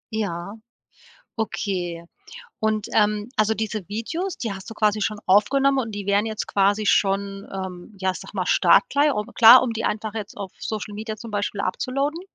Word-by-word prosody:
Ja, 200 -2 -3 0.8
okay. 180 -6 -3 0.6
Und, 215 -1 0
ähm, 210 0 +2
also, 215 +1 +2
diese 215 -3 -4
Videos, 320 - -3
die 225 -4 -3
hast 190 +2 -9
du - - -7
quasi 215 0 +1
schon 210 +1 -1
aufgenommen 270 +8 +4
und 230 -4 -2
die 205 -1 -6
wären 200 +2 +2
jetzt 220 -1 -4
quasi 205 +2 +1
schon, 195 0 +1
ähm, 190 +1 -7
ja, 190 0 0
ich - - -8
sage - - -11
mal, - - -1
startklar, 290 - +4
un 210 - -2
klar, 240 +2 +9
um 250 -2 -1
die 225 0 -4
einfach 215 0 -2
jetzt 210 -2 -6
auf 195 -2 -7
Social 215 -1 -5
Media 215 +1 -5
zum 230 0 -10
Beispiel 205 0 -2
upzuloaden? 275 - -2
210 Hz, 180 wpm, -23 LUFS, 200-225 Hz, 0.8 s, klar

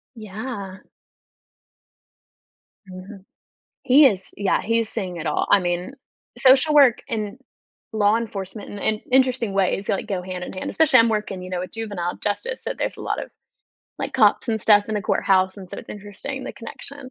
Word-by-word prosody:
Yeah. 205 -3 -7 2.1
Mhm. 190 +2 -11 0.6
He 275 +2 +7
is, 190 -5 0
yeah, 200 -1 +1
he's 230 0 0
seeing 185 -6 -4
it 165 -1 -6
all, - - 0
I 205 - +6
mean, 175 +5 -2 0.5
social 265 +4 +5
work 270 -5 +6
and 215 +1 -3 0.5
law 210 0 +3
enforcement 210 -2 -5
in 205 - -7
in 215 +1 0
interesting 255 -5 +2
ways, 195 +1 0
like, 195 - -1
go 190 -3 -3
hand 180 -1 -5
in - - -8
hand, 185 - -5
especially 305 -6 +5
I'm 230 - +6
working, 210 -4 -2
you 185 - -8
know, 180 -1 -2
a 185 - -6
juvenile 205 -6 -4
justice, 480 - -3
so - - -3
there's - - -3
a - - -9
lot - - -2
of, - - -9 0.7
like, - - -4
cops - - +3
and 220 -1 0
stuff 205 0 +4
in 215 - -2
the 210 - -1
courthouse, 190 0 +2
and 190 -2 -10
so - - -7
it's - - -11
interesting 210 +7 -7
the - - -6
connection. 270 +3 -9
210 Hz, 180 wpm, -22 LUFS, 190-235 Hz, 2.1 s, He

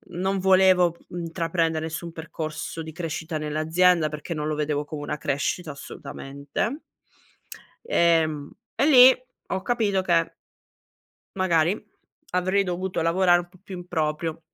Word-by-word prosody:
non 190 +2 0
volevo 185 -2 +4
intraprendere 165 -1 -1
nessun 165 +1 -5
percorso 160 0 -6
di 160 - -8
crescita 165 0 -4
nell'azienda 155 +2 +2
perché 150 +3 -5
non 150 -1 -3
lo 155 - -1
vedevo 150 -1 -1
come 150 0 -6
una 145 - -3
crescita, 150 +4 -2
assolutamente. 140 - -5 1.1
Ehm, 160 - +2 0.3
e 275 - +2
lì 260 -3 +9 0.3
ho 190 - -2
capito 210 -4 +1
che 170 -3 +1 1.0
magari 185 0 +1 0.5
avrei 185 +2 +2
dovuto 180 -1 -2
lavorare 175 +1 +4
un 175 0 -8
po' 185 - -20
più 190 -3 -8
in 175 0 -10
proprio. 160 -1 -2
170 Hz, 130 wpm, -25 LUFS, 155-185 Hz, 1.1 s, lì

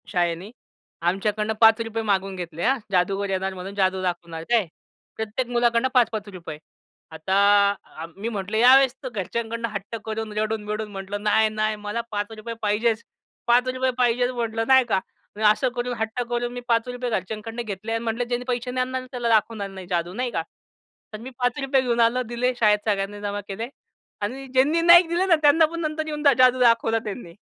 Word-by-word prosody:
शाळेने, 175 +2 -1 0.5
आमच्याकडनं 210 +5 0
₹5 225 0 +4
मागवून 195 -2 0
घेतले 170 -2 -6
हा, 265 +3 +3
जादूगर 195 +2 +1
येणार 190 0 -1
म्हणून 190 +2 -8
जादू 190 -1 +1
दाखवणार 170 -2 -4
आहे - - -10
काय? 210 -6 0 0.5
प्रत्येक 220 +3 -3
मुलाकडनं 240 0 +2
₹5-₹5 205 - -1 0.5
आता 160 +4 -2 0.6
अ, 160 - -6
मी 215 +4 -3
म्हटलं 205 -1 -3
यावेळेस 260 +2 +6
तर 260 - -4
घरच्यांकडनं 230 +2 -3
हट्ट 205 +2 -6
करून 220 0 -4
रडून-बिडून 215 0 -2
म्हटलं, 195 +1 -6
"नाही-नाही 215 0 +2
मला 210 +2 -4
₹5 215 +2 -4
पाहिजेच. 220 +2 +1 0.5
₹5 255 +2 +2
पाहिजे" 245 0 +2
म्हटलं 225 -2 -2
नाही 265 -1 +6
का? 190 - +2 0.4
मी 215 - -5
असं 255 +4 0
करून 245 0 -2
हट्ट 220 +2 -2
करून 240 0 -2
मी 245 - -6
₹5 245 +1 0
घरच्यांकडनं 220 +2 -4
घेतले 215 +2 -5
अन् 230 0 -2
म्हटलं, 230 +1 -1
"ज्यांनी 245 +1 -3
पैसे 250 0 -2
नाही 255 0 0
आणणार 255 0 -4
त्याला 240 -2 -2
दाखवणार 215 -2 +1
नाही 190 -2 -10
जादू." 175 0 -2
नाही 245 +3 -2
का? 165 - -1 0.7
तर - - -4
मी 240 +4 -8
₹5 265 +2 +1
घेऊन 240 -2 -1
आलं 235 +2 +3
दिले 245 +2 0
शाळेत 210 -2 +4
सगळ्यांनी 205 0 -2
जमा 205 0 -3
केले 215 +4 -5 0.5
आणि 265 +6 -4
ज्यांनी 270 +6 +2
नाही 345 +1 +8
दिलं 345 +3 0
ना 345 - +6
त्यांना 315 +2 +6
पण 335 +2 -5
नंतर 310 0 -2
येऊन 300 -1 -4
द 280 -2 +6
जादू 255 0 +5
दाखवला 230 -2 +3
त्यांनी. 200 -5 -7
225 Hz, 175 wpm, -24 LUFS, 205-245 Hz, 0.7 s, नाही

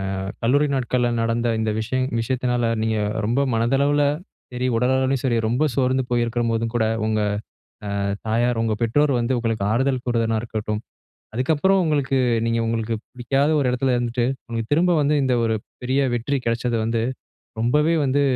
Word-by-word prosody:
அ - - -4 0.2
கல்லூரி 145 +6 +3
நாட்கள்ல 125 -1 0
நடந்த 115 +1 0
இந்த 110 -1 0
விஷயம் 130 +3 -1
விஷயத்தினால, 125 0 -1 0.2
நீங்க 110 0 0 0.3
ரொம்ப 120 +5 +1
மனதளவில 140 +5 +2 0.5
சரி, 125 +1 -2
உடலளவுலயும் 130 +2 +1
சரி, 125 -3 +1
ரொம்ப 120 +6 +1
சோர்ந்து 130 0 +2
போயிருக்கும்போதும் 115 -1 0
கூட, 115 -2 +2 0.2
உங்க 110 0 +1 0.8
அ - - -1 0.3
தாயார் 120 +1 +1
உங்க 110 -1 0
பெற்றோர் 140 +5 +2
வந்து, 120 +2 0
உங்களுக்கு 115 -4 -1
ஆறுதல் 130 +2 +1
கூறுயதா 115 -2 +1
இருக்கட்டும், 105 -2 -3 0.5
அதுக்கப்புறம் 160 +10 +2
உங்களுக்கு 140 -4 +1 0.3
நீங்க, 115 0 +1
உங்களுக்கு 115 0 -1 0.2
பிடிக்காத 135 +3 0
ஒரு 135 - +1
எடத்துல 125 0 +1
இருந்துட்டு, 120 0 0 0.2
உங்களுக்கு 115 +2 -4
திரும்ப 175 +3 +3
வந்து, 145 +1 +2
இந்த, 130 -1 +2
ஒரு 110 -1 +1 0.3
பெரிய 130 +2 +1 0.2
வெற்றி 135 +4 -1
கெடைச்சது 115 0 0
வந்து, 115 0 0 0.6
ரொம்பவே 150 +8 +2
வந்து 135 +2 +2
120 Hz, 150 wpm, -22 LUFS, 115-135 Hz, 0.8 s, கல்லூரி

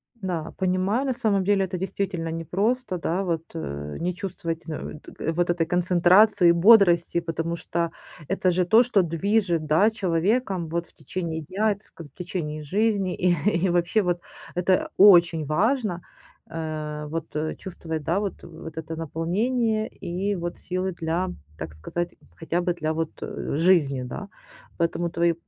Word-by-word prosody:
Да, 175 -7 -4
понимаю. 190 +7 +1
На 265 - 0
самом 215 -6 +1
деле 200 0 +3
это 185 0 -4
действительно 185 -2 -3
непросто, 190 - -1
да. 175 +3 -1
Вот, 165 -3 -1
э, 75 - -5
не 180 +2 -1
чувствовать, 175 -4 -5
э, 155 -1 -6
т 160 - -5
вот 175 +1 0
этой 175 -1 +1
концентрации 180 +2 +5
и - - +8
бодрости, 170 -2 +5
потому 165 0 -3
что 170 0 -2 0.4
это 185 +1 +1
же 180 0 +1
то, 225 +7 +6
что 225 -5 +3
движет, 175 0 +1
да, 160 +8 +4
человеком, 190 -1 0
вот, 170 +1 -2
в - - -17
течение 160 +1 -4
дня, 205 +7 0
так 200 +1 -16
сказать, 160 -3 -12
в - - -22
течение 160 -4 -4
жизни. 200 +3 +1
И, 180 -1 +2 0.3
и - - +2
вообще, 175 +5 +2
вот 175 -2 0 0.4
это 180 +1 +2
очень 175 -5 +7
важно, 200 - +1 0.5
э, 155 -2 -4
вот, 165 0 -5
э, 155 +1 -2
чувствовать, 160 -4 -6
да, 170 +6 +1
вот, 205 -3 -4
вот 160 -1 -10
это 160 0 -5
наполнение 215 - 0 0.2
и 190 +3 -1
вот 175 -1 -4
силы 185 +1 -2
для, 170 +1 -2 0.3
так 80 -1 -6
сказать, 170 - -4 0.2
хотя 165 +2 -1
бы 175 0 0
для 155 -2 -2
вот 160 0 -2 0.5
жизни, 155 -6 +3
да. 125 +10 -6 0.5
Поэтому 170 0 0
твои 170 0 +2
175 Hz, 160 wpm, -25 LUFS, 165-195 Hz, 0.5 s, и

